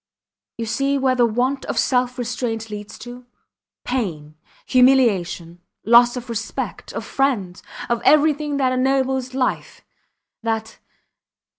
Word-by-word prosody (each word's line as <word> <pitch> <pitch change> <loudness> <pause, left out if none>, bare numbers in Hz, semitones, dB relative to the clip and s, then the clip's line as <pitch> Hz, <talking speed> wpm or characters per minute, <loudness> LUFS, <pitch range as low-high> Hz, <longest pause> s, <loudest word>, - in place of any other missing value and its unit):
You 230 - -3
see 275 +5 0
where 265 -1 +2
the 245 -2 +3
want 250 +5 -1
of - - -4
self 250 0 +1
restraint 225 -2 -3
leads 210 0 -7
to. 245 +1 -10 0.6
Pain 170 - -3 0.3
humiliation 200 -10 +2 0.2
loss 240 +2 +6
of 250 0 -7
respect 230 -1 -5
of - - -5
friends, 220 -10 -1 0.3
of 235 -1 -1
everything 300 -1 +3
that 260 -2 +1
ennobles 260 0 0
life, 260 -1 -2 0.6
that 225 -1 -3
245 Hz, 120 wpm, -21 LUFS, 225-265 Hz, 0.6 s, loss